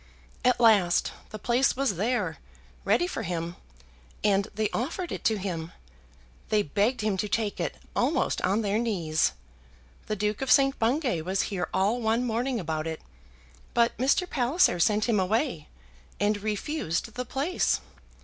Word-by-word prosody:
At 250 Hz, -1 st, +3 dB
last, 205 Hz, -7 st, +4 dB, 0.2 s
the 215 Hz, -, -7 dB
place 240 Hz, +5 st, +2 dB
was 270 Hz, -7 st, +1 dB
there, 235 Hz, +7 st, -1 dB, 0.5 s
ready 350 Hz, -, +3 dB
for 355 Hz, -, -4 dB
him, 170 Hz, -3 st, -3 dB, 0.7 s
and 200 Hz, -1 st, +3 dB
they 215 Hz, 0 st, +1 dB
offered 335 Hz, +8 st, -3 dB
it -, -, -5 dB
to 220 Hz, -2 st, +3 dB
him. 170 Hz, -4 st, -4 dB, 0.8 s
They 210 Hz, -1 st, +3 dB
begged 205 Hz, -, 0 dB
him 210 Hz, -2 st, 0 dB
to 210 Hz, +2 st, -2 dB
take 215 Hz, -1 st, -1 dB
it, -, -, -2 dB, 0.2 s
almost -, -, +1 dB
on 205 Hz, +4 st, +1 dB
their 205 Hz, +1 st, +1 dB
knees. 170 Hz, -9 st, +1 dB, 0.7 s
The 215 Hz, -, -1 dB
Duke 210 Hz, +2 st, -1 dB
of 270 Hz, -, -2 dB
St. 275 Hz, 0 st, +4 dB
Bungay 245 Hz, -, +1 dB
was 185 Hz, +4 st, 0 dB
here 180 Hz, -2 st, -2 dB
all 205 Hz, +6 st, +1 dB
one 225 Hz, +2 st, +1 dB
morning 240 Hz, +2 st, -1 dB
about 160 Hz, -2 st, -3 dB
it; 160 Hz, -1 st, -4 dB, 0.8 s
but 235 Hz, 0 st, +3 dB
Mr. 280 Hz, +8 st, +2 dB
Palliser 255 Hz, -, +2 dB
sent 210 Hz, +4 st, +3 dB
him 225 Hz, -4 st, +2 dB
away, 200 Hz, -, 0 dB, 0.5 s
and 205 Hz, 0 st, +1 dB
refused 215 Hz, -, -2 dB
the 250 Hz, -, -3 dB
place. 275 Hz, +8 st, 0 dB
215 Hz, 155 wpm, -27 LUFS, 190-245 Hz, 0.8 s, last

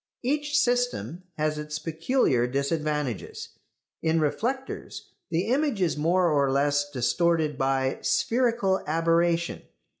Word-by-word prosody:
Each 295 Hz, +3 st, 0 dB
system 245 Hz, -, 0 dB
has 155 Hz, 0 st, -1 dB
its 150 Hz, 0 st, -4 dB
peculiar 160 Hz, -, +1 dB
disadvantages. 145 Hz, -, -2 dB, 0.5 s
In 160 Hz, 0 st, +2 dB
reflectors 245 Hz, -, -3 dB, 0.2 s
the 170 Hz, +2 st, 0 dB
image 275 Hz, -3 st, +1 dB
is 175 Hz, -4 st, +1 dB
more 170 Hz, +3 st, +2 dB
or 140 Hz, -2 st, +2 dB
less 145 Hz, +1 st, +1 dB
distorted 150 Hz, +4 st, +1 dB
by 135 Hz, 0 st, 0 dB
"spherical 230 Hz, -6 st, +1 dB
aberration." 165 Hz, +1 st, +1 dB
165 Hz, 110 wpm, -26 LUFS, 145-200 Hz, 0.5 s, In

